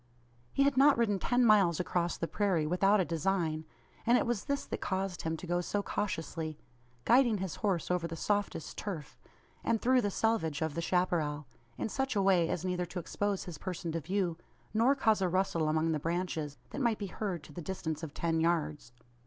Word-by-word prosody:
He 275 - +3
had 280 -1 +2
not 280 +1 +6
ridden 210 -4 +2
ten 245 +5 +2
miles 195 -7 +5
across 175 -1 0
the 165 - -2
prairie 185 -7 +1
without 195 +6 +3
a 185 - +2
design; 165 -2 -1 0.4
and 240 +2 +5
it - - +1
was 235 -4 -1
this 280 -1 -1
that - - -5
caused 190 -1 -2
him 160 0 -2
to 180 - -8
go 175 0 0
so 205 +3 -2
cautiously 165 -6 -3 0.5
guiding 240 -3 +5
his 190 -4 -4
horse 185 -5 0
over 180 -2 0
the 165 - -6
softest 205 -2 -2
turf, 170 -9 -6 0.4
and 230 - +1
through 255 +2 +4
the 205 - 0
selvedge 195 -9 0
of 160 -2 -2
the 170 - -2
chapparal 165 -4 0 0.3
in - - -1
such 270 +2 -2
a 200 - +3
way 180 -4 +4
as 180 - -2
neither 180 -1 -1
to 175 - -8
expose 200 +3 -2
his 175 -4 -8
person 175 -3 -4
to 165 - -1
view, 180 0 -1 0.3
nor 235 +6 +4
cause 220 -6 +2
a 185 - +2
rustle 175 -4 +1
among 160 +1 +1
the 155 - 0
branches, 165 -3 -2
that 280 - -4
might 235 -4 +2
be 205 - -4
heard 190 -4 -4
to - - -13
the 175 - -6
distance 160 -3 -4
of 160 -3 -5
ten 165 +1 0
yards. 155 -6 0
180 Hz, 205 wpm, -32 LUFS, 165-205 Hz, 0.5 s, not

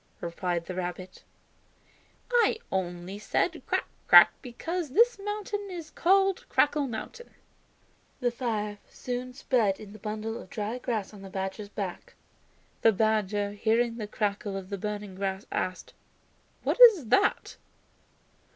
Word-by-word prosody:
replied 170 0 -2
the 185 - -5
rabbit; 180 0 -5 1.1
"I 475 -2 +4
only 180 +1 -3
said 210 - 0
'Crack, - - 0 0.2
crack' - - +9
because 325 +7 -4
this 465 - +4
mountain 415 0 -4
is 335 -4 -7
called 385 +2 +2
Crackling 290 -2 +2
Mountain." 475 - -7 0.9
The 245 -2 +1
fire 215 -4 -3
soon 250 0 -5
spread 225 -8 +1
in 205 -1 -10
the 215 - -12
bundle 215 +2 -4
of - - -14
dry 215 +5 -3
grass 220 -5 -3
on 205 - -11
the 195 - -9
badger's 190 +2 -4
back. 195 -3 -6 0.7
The 225 - +6
badger, 210 -1 +1
hearing 230 +3 +1
the 215 -3 -4
crackle 205 -1 -2
of 190 0 -8
the 200 - -2
burning 210 -1 -4
grass, 190 +1 -3
asked, 185 0 -3 0.7
"What - - 0
is 400 - +8
that?" 325 - +2
215 Hz, 135 wpm, -28 LUFS, 195-265 Hz, 1.1 s, crack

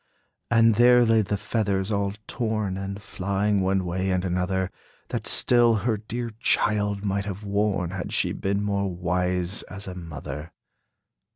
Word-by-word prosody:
And 115 -1 +5
there 120 0 +6
lay 115 -1 +4
the 105 0 -1
feathers, 100 -2 -1
all 100 -1 0
torn, 110 -5 -2
And 100 +1 -5
flying 100 0 -1
one 95 0 +1
way 95 +2 -1
and 90 0 0
another, 95 +1 -1 0.4
That - - -3
still 120 -2 +5
her 110 +2 0
dear 115 +3 -5
child 105 -3 +1
might 100 0 -1
have 100 0 -5
worn, 100 -3 0
Had 95 -1 -5
she - - +1
been 100 +1 -1
more 100 -1 0
wise 90 +1 -1
as 100 +1 -6
a 95 - -5
mother. 75 -3 -7
100 Hz, 155 wpm, -25 LUFS, 95-105 Hz, 0.4 s, there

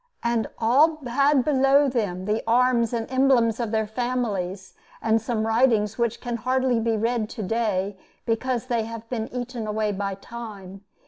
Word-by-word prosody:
And 235 -1 0
all 280 +8 +4
had 275 +2 +3
below 280 0 +4
them 205 -8 -2
the 210 +2 0
arms 240 -1 +3
and 230 -2 -2
emblems 260 -4 +3
of 235 -2 -1
their 220 0 0
families, 210 -5 -3 0.3
and 225 0 +2
some 220 -1 -1
writings 225 -2 +2
which 235 -1 0
can 240 -1 -3
hardly 255 +1 +1
be 225 -1 0
read 225 0 0
to 225 -3 -6
day 200 -2 -1 0.3
because 240 +1 -1
they 235 -3 -1
have 230 0 -8
been 225 -2 -3
eaten 245 -2 -5
away 215 0 0
by 200 0 -3
time. 200 -3 -9
230 Hz, 165 wpm, -24 LUFS, 215-250 Hz, 0.3 s, all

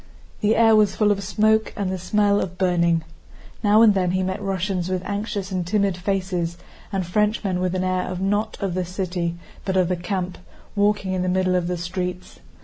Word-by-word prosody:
The 210 +1 +2
air 225 -1 +6
was 210 -2 +3
full 210 -1 +3
of 200 -1 -1
smoke 215 +2 +2
and 195 -3 -1
the 190 - -3
smell 205 +2 +2
of 180 0 -5
burning. 170 -3 +2 0.6
Now 210 +2 +6
and 215 -2 +7
then 185 -2 +1
he 185 0 +1
met 190 +2 -2
Russians 190 -2 -1
with 185 -1 -1
anxious 200 -1 -3
and 185 -1 -1
timid 195 +1 +1
faces, 180 -2 -2 0.3
and 195 -2 -1
Frenchmen 205 0 0
with 185 0 -1
an 185 - 0
air 185 0 -1
not 205 +3 0
of 195 -3 -1
the 185 +1 -1
city 180 -1 -3 0.3
but 190 -1 -1
of 180 -2 +3
the 180 - +1
camp, 180 +1 -3 0.4
walking 205 -2 +1
in 185 - 0
the 185 - 0
middle 185 0 +1
of 180 -1 +1
the 180 0 -2
streets. 180 +1 -5
185 Hz, 200 wpm, -23 LUFS, 180-205 Hz, 0.6 s, and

